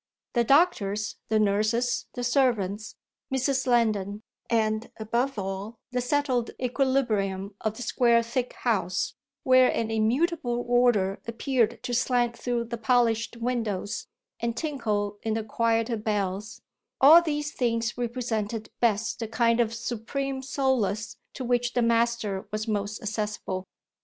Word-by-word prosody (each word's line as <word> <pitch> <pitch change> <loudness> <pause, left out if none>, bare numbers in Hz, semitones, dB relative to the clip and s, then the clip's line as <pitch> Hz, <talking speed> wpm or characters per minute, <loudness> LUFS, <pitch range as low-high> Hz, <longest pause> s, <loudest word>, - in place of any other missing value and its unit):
The 240 - +3
doctors, 220 - +2
the 220 - +3
nurses, 215 +4 +1
the 245 - -3
servants, 220 -5 +1 0.4
Mrs. 265 0 0
Lendon, 215 -4 +1 0.3
and 220 -1 +1
above 235 +4 -1
all 195 +3 -4
the 250 0 0
settled 255 -2 0
equilibrium 235 -7 0
of 220 -1 -1
the 250 - -6
square 235 0 +3
thick 240 +2 -2
house, 190 -6 0 0.3
where 255 -3 +6
an 225 -1 -1
immutable 240 +2 0
order 240 -6 +3
appeared 230 -1 0
to 245 - -3
slant 240 -1 +1
through 240 0 -1
the 235 0 -6
polished 230 0 +2
windows 230 -4 -2 0.3
and 235 0 -2
tinkle 210 -8 -2
in 220 -1 -1
the 225 - -1
quieter 230 +1 0
bells, 210 +1 -3 0.4
all 310 +6 +9
these 295 -2 -2
things 230 -3 -1
represented 230 -3 -3
best 225 -2 +1
the 225 - -3
kind 230 +1 +2
of 230 -2 +2
supreme 265 +4 -3
solace 255 -6 0 0.2
to 260 - -5
which 245 -1 0
the 245 - +2
master 230 -4 +1
was 215 +1 -3
most 210 0 -2
accessible. 210 -3 -3
230 Hz, 130 wpm, -27 LUFS, 215-250 Hz, 0.4 s, all